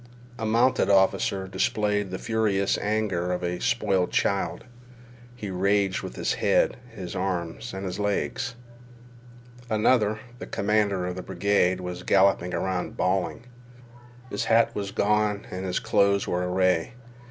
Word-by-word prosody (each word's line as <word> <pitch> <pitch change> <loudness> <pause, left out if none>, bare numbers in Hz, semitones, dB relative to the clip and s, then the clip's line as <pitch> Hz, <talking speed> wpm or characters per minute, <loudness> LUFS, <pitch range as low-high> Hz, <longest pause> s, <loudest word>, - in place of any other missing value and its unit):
A 110 - -2
mounted 120 +4 +3
officer 95 0 +2
displayed 105 +1 0
the 95 - -4
furious 105 -3 +1
anger 105 -4 -1
of 90 0 -2
a 90 0 -2
spoiled 95 -3 +1
child. 100 -1 0 0.7
He 105 -5 -6
raged 100 +1 +1
with - - -7
his - - 0
head, - - +2
his 95 -6 -7
arms, 90 +4 -3
and 95 +1 -5
his 95 +2 -4
legs. 120 +5 -1 1.1
Another, 110 -1 +2 0.2
the - - -7
commander 100 -3 +1
of 90 0 -3
the - - -3
brigade, 95 0 +1
was 90 0 -5
galloping 95 -2 +3
about 95 -1 -2
bawling. 90 -1 0 0.9
His - - -2
hat 115 +1 +3
was 100 -1 -3
gone 105 0 +1
and 95 +1 -4
his 90 - -1
clothes 100 0 +2
were 90 0 -1
awry. 90 0 +1
100 Hz, 140 wpm, -26 LUFS, 90-105 Hz, 1.1 s, mounted